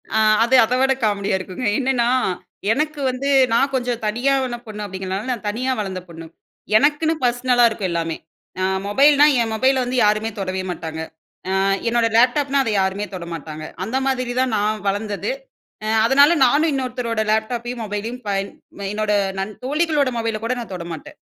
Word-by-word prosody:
அ - - +4 0.2
அது 245 +3 +3
அத 235 +3 0
விட 265 0 +3
காமெடி 205 -2 0
யா 190 - +2
இருக்குங்க. 185 +6 -6
என்னன்னா, 255 -3 +1 0.6
எனக்கு 300 +4 -1
வந்து 255 +2 -2 0.2
நான் 270 +4 +2
கொஞ்சம் 245 -2 -2
தனியாவேன 255 +2 0
பொண்ணு 210 -1 -7
அப்பிடிங்கிறனால 190 +4 -4
நான் 235 -3 -5
தனியா 255 +5 -1
வளந்த 190 -3 -3
பொண்ணு. 165 0 -10 0.5
எனக்குன்னு 300 +5 +2
பர்ஸ்னலா 245 0 +2
இருக்கும் 205 -4 -3
எல்லாமே! 165 -1 -2 0.4
அ - - +1 0.2
மொபைல்னா 285 +6 +5 0.2
என் 225 -1 -1
மொபைல 260 +3 +2
வந்து 250 +1 -2
யாருமே 215 +1 +1
தொடவே 190 -1 -3
மாட்டாங்க. 160 -2 -6 0.5
அ - - -1 0.4
என்னோட 235 0 +2
லேப்டாப்னா 275 +3 +3
அதை 230 - -1
யாருமே 190 +2 -1
தொட 180 -2 -6
மாட்டாங்க. 155 -1 -7 0.2
அந்த 250 +5 -2
மாதிரி 255 -2 -1
தான் 260 -3 0
நான் 210 0 -1
வளர்ந்தது. 205 - -2 0.5
அ - - -2 0.2
அதனால 280 +5 +6
நானும் 300 +5 +3
இன்னொருத்தரோட 250 -4 -2
லேப்டாப்பையும் 235 +2 -2
மொபைலையும் 220 +4 -5
பயன் 195 0 -1 0.4
என்னோட 215 0 -1 0.3
நன் 195 +2 -3
தோழிகளோட 295 -1 +1
மொபைல 225 -1 -1
கூட 240 - 0
நான் 225 -5 -7
தொடமாட்டேன். 170 -3 -8
230 Hz, 160 wpm, -21 LUFS, 205-260 Hz, 0.6 s, அதனால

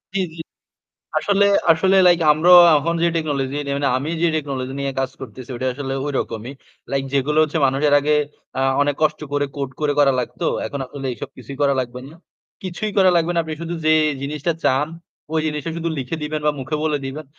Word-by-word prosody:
জ্বী, 195 - +2
জ্বী। 165 - -7 0.8
আসলে, 200 -1 +2 0.3
আসলে 190 +4 +2
লাইক 175 -1 +5
আমরা 160 +4 +2 0.3
এখন 170 +4 -1
যে 170 - +4
টেকনোলজি 145 -3 -2
নে 140 - -3
মানে 140 0 0
আমি 145 +5 -3
যে 170 - +4
টেকনোলজি 135 -4 -3
নিয়ে 140 -1 -2
কাজ 135 0 -1
করতেছি 130 +1 -9
ওটা 130 - -3
আসলে 135 -1 -4
ঐরকমই। 125 -3 -3 0.4
লাইক 135 0 -1
যেগুলো 140 +2 +1
হচ্ছে 155 +1 -1
মানুষে 135 +3 0
এর - - +5
আগে 150 +1 +1 0.4
আ - - +1 0.2
অনেক 145 0 0
কষ্ট 155 0 +1
করে 145 0 +1
কোড 140 -2 -3
করে 150 -1 +1
করা 140 -2 +5
লাগতো। 120 - -4 0.2
এখন 140 - -5
আসলে 135 +1 -7
এসব - - -8
কিছুই 140 - -9
করা 140 -1 +3
লাগবে 125 0 -6
না। 155 - -14 0.5
কিছুই 190 +3 -4
করা 190 -1 +6
লাগবে 170 0 +1
না 170 - +1
আপনি 160 -1 -5
শুধু 170 +1 -4
যে 155 - +5 0.3
জিনিসটা 150 +4 -2
চান 135 +3 +2 0.5
ওই 160 - +2
জিনিসটা 150 +1 -3
শুধু 170 0 -2
লিখে 135 +5 -3
দিবেন 150 0 -3
বা 150 - +3
মুখে 150 +4 -3
বলে 155 -2 0
দিবেন। 150 +4 -6
145 Hz, 205 wpm, -21 LUFS, 135-160 Hz, 0.8 s, করা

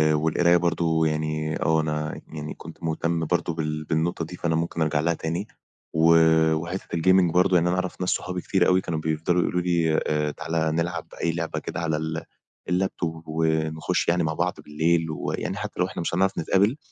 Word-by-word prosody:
والقراية 85 +3 +3
برضه 80 -2 +1
يعني 75 0 -1
آه، 80 +1 +3
أنا 75 0 -3
يعني 75 -1 -6
كنت 80 +1 -12
مُهتم 80 0 -1
برضه 85 +1 0
بال 75 -1 -3
بالنقطة 80 +2 -1
دي 90 - -8
فأنا 85 -2 0
ممكن 85 +1 -2
أرجع 80 -1 +1
لها 85 +3 +1
تاني. 85 +5 -3 0.5
و 80 +1 +5 0.4
وحتّة 85 +4 -4
الgaming 95 +1 +4
برضه 90 +1 +4
يعني 85 0 +4
أنا 90 - +1
أعرف 95 0 -3
ناس 90 - 0
صحابي 90 0 -2
كتير 95 -1 +2
أوي 95 0 +4
كانوا 80 -3 -3
بيفضلوا 80 +3 0
يقولوا 90 +1 0
لي: 85 -3 +1
"آآ 75 0 0
تعالَ 80 +1 -1
نلعب 85 +1 -2 0.2
أي 85 - +2
لعبة 85 0 -3
كده - - -5
على 80 -2 0
ال 80 +1 -3 0.5
اللاب 95 +2 0
توب 80 -1 -4
ونخُش 80 +1 0
يعني 85 0 +2
مع 80 0 0
بعض 90 +3 0
بالليل 80 +2 +1
ويعني 80 - -3
حتّى - - -6
لو 90 - +3
إحنا 90 - -5
مش 85 - -2
هنعرف 95 +2 +1
نتقابل، 100 - +2
80 Hz, 190 wpm, -25 LUFS, 80-90 Hz, 0.5 s, و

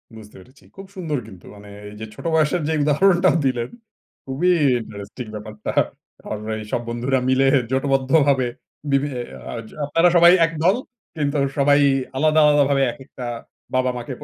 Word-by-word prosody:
বুঝতে 105 -1 -13
পেরেছি। 130 +9 -19
খুব 195 0 -10
সুন্দর 160 -6 -3
কিন্তু 95 -4 -14
মানে 100 0 -13 0.2
এই 105 - -12
যে 110 - -5
ছোট - - -12
বয়সের 160 +2 +2
যে 160 - 0
উদাহরণটাও 175 +4 +3
দিলেন 125 -2 -1 0.6
খুবই 150 +7 +1 0.3
ইন্টারেস্টিং 105 +4 -9
ব্যাপারটা। 105 0 -6 0.5
কারণ 105 0 -6
এই 110 - -6
সব 120 - -1
বন্ধুরা 125 +3 0
মিলে 135 +1 +3 0.2
জোটবদ্ধভাবে 135 0 +2 0.4
বিভি 140 +1 +2 0.4
আ - - -5 0.3
আপনারা 165 +4 +3
সবাই 170 +1 +8
একদল 165 +5 +1 0.4
কিন্তু 145 0 -1 0.2
সবাই 145 +1 +4 0.4
আলাদা, 155 +2 +3
আলাদা 145 -1 +5
ভাবে 135 -1 +2
এক - - -13
একটা 125 -3 -9 0.5
বাবা 130 0 +2
মাকে। 120 +2 -6
135 Hz, 150 wpm, -21 LUFS, 120-155 Hz, 0.6 s, সবাই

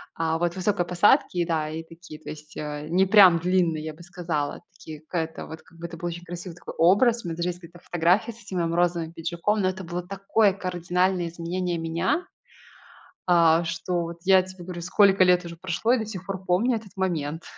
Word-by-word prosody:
А, 165 0 0
вот 175 +1 -1
высокой 185 -1 0
посадки, 180 - +3
да, 160 -3 -1
и 160 +1 -5
такие, 165 -1 -13
то - - -10
есть, 150 0 -10
э, 150 0 -5
не 185 +3 +3
прям 185 -4 +7
длинные, 175 -3 +1
я 155 0 -5
бы 170 +3 -14
сказала, 165 -5 -3
такие 155 -2 -11
какая-то 160 0 -4
вот 160 0 -9
как 165 - -20
бы 170 - -6
это 170 - -9
был 175 - -4
очень 175 0 -6
красивый 175 0 -7
такой - - -9
образ. 225 +8 +4
У - - -6
меня 165 - -4
даже 175 +1 -1
есть 175 - -5
где-то 170 0 -14
фотография 175 +7 +1
с 230 - -17
этим 190 -2 -6
моим 165 -1 0
розовым 170 -2 0
пиджаком, 170 +6 -1
но 185 - +2
это 190 0 -6
было 175 +1 -4
такое 195 +1 +2
кардинальное 180 -1 -1
изменение 175 +1 -3
меня, 170 - -1 1.0
а, 170 -2 +4
что 170 +1 -2
вот 170 0 -6
я 190 0 +5
тебе 185 -1 -11
говорю, 175 -1 -7
сколько 190 +2 +4
лет 180 -1 +4
уже 170 0 -8
прошло 185 +7 -1
и 255 - +3
до 220 - -3
сих 195 -3 -7
пор 190 -1 -5
помню 210 +7 +2
этот 215 -3 -10
момент. 165 -4 -2
175 Hz, 210 wpm, -25 LUFS, 165-185 Hz, 1.0 s, прям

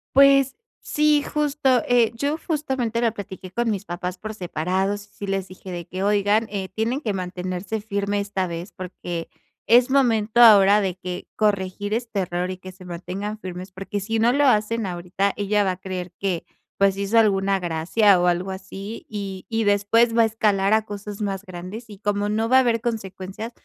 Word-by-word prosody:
Pues, 275 -1 +6 0.2
sí 300 -1 +2
justo, 285 -5 +1
eh, 240 -2 +4
yo 285 +6 -1
justamente 265 -8 -1
lo 230 -2 +2
platiqué 190 -2 -8
con 235 +4 0
mis 205 -3 -2
papás 180 0 -5
por 215 +2 -6
separados, 190 +2 -1
sí 205 0 -9
les 195 -1 -2
dije 185 0 -9
de 170 -1 -5
que: 185 +2 -4
"Oigan, 205 +2 +2
eh, 195 -2 -4
tienen 230 +6 -1
que 220 -8 -1
mantenerse 185 +2 -4
firme 200 -1 -1
esta 200 -2 -2
vez, 170 +2 -6
porque 175 -2 -6 0.4
es 245 +2 +6
momento 235 -5 +2
ahora 205 -3 +8
de 190 -3 -1
que 180 -1 -6
corregir 205 0 0
este 230 -3 -2
error, 180 0 -2
y 185 - -3
que 185 0 -10
se 185 0 -15
mantengan 185 +5 -5
firmes, 185 +1 -7
porque 195 +2 -4
si 225 +3 -2
no 235 +2 +4
lo 285 +2 +3
hacen 220 -1 +2
ahorita 180 +2 -1
ella 205 0 +1
va 190 - +2
a 180 - -5
creer 180 -2 -5
que, 185 -4 -2 0.3
pues, 195 -1 +3
hizo 200 +3 0
alguna 195 -2 +2
gracia, 180 +4 +3
o, 180 - +2
algo 180 +2 0
así, 195 +3 -8
y 195 -3 -5
y 225 -1 0
después 225 +3 +3
va - - +7
a - - +6
escalar 205 -3 +1
a 220 0 +3
cosas 205 -1 -7
más 195 -1 -2
grandes, 185 +6 -8
y 205 - -11
como 205 0 -1
no 220 +2 0
va 255 +3 +5
a - - +8
haber 235 -2 +1
consecuencias, 210 -1 -5
205 Hz, 190 wpm, -23 LUFS, 185-225 Hz, 0.4 s, ahora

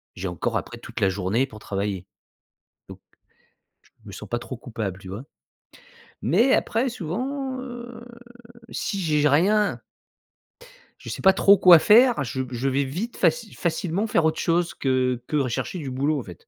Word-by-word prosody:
J'ai 95 - -4
encore 90 -3 -2
après - - -6
toute - - -8
la 95 - +4
journée 100 +6 0
pour 110 -4 -12
travailler. 100 -2 -4 0.8
Donc - - -10 0.8
je - - -28 0.2
me 100 - -9
sens 100 +2 -10
pas 120 - -1
trop 125 +2 -7
coupable, 110 -6 -5
tu 95 - -12
vois? 100 +6 -6 1.0
Mais, 235 +10 +3
après 230 +4 0
souvent, 260 - -4
heu, 240 -2 -9 0.7
si 200 - -3
j'ai 150 -4 +1
rien 200 +8 +2 1.2
je - - -10
sais - - -5
pas 190 0 +6
trop 200 +1 +5
quoi 180 -3 +8
faire, 235 - +5
je 130 +1 -3
je 125 +2 -1
vais 140 +1 +1
vite 180 - -5
faci 230 -3 0
facilement 180 +4 -2
faire 170 -6 +2
autre 160 0 +1
chose, 170 0 0
que 130 -2 0
que 150 - -1
rechercher 135 +7 -2
du 145 -4 -5
boulot, 140 +3 0
en - - -6
fait. 90 -5 -13
150 Hz, 170 wpm, -24 LUFS, -, 1.2 s, quoi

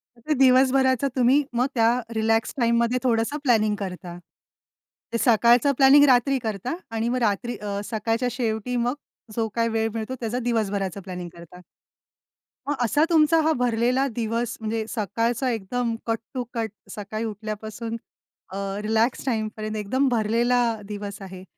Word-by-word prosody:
मग 235 - -22
ते 310 - +3
दिवसभराचा 260 0 +4
तुम्ही 260 +3 +4
मग 245 +2 +2
त्या 225 -1 +4 0.3
रिलॅक्स 225 0 +1
टाईममध्ये 235 0 +2
थोडसं 235 +3 +1
प्लॅनिंग 215 -5 +3
करता. 180 -3 -6 1.0
ते - - +2
सकाळचं 235 +3 +4
प्लॅनिंग 275 +1 +7
रात्री 265 +1 +4
करता 220 - -3 0.2
आणि 225 +1 -1
मग 250 - 0
रात्री 235 +4 -1
अ, 200 0 -4
सकाळच्या 225 +3 0
शेवटी 230 0 -2
मग 245 - +1 0.4
जो 225 -1 0
काही 230 0 +1
वेळ 225 0 0
मिळतो 225 +3 -4
त्याचा 235 +2 -2
दिवसभराचं 205 -5 -1
प्लॅनिंग 180 -2 -6
करता. 170 +1 -13 1.1
मग 290 - +1
असा 290 +6 +2
तुमचा 325 -1 +4
हा 315 +1 +2
भरलेला 245 +2 +1
दिवस 230 0 -2
म्हणजे 220 0 -2
सकाळचा 230 +4 -1
एकदम 230 +2 -2
कट 225 0 +1 0.2
टू 255 -2 -2
कट 225 -2 -2 0.3
सकाळी 215 +2 -5
उठल्यापासून 220 +1 -5 0.5
अ, 190 - -7 0.2
रिलॅक्स 220 +3 +1
टाईम 220 -5 0
पर्यंत 215 0 -4
एकदम 260 +7 0
भरलेला 235 +2 +2 0.3
दिवस 205 0 -6
आहे. 185 -1 -9
230 Hz, 145 wpm, -24 LUFS, 215-250 Hz, 1.1 s, प्लॅनिंग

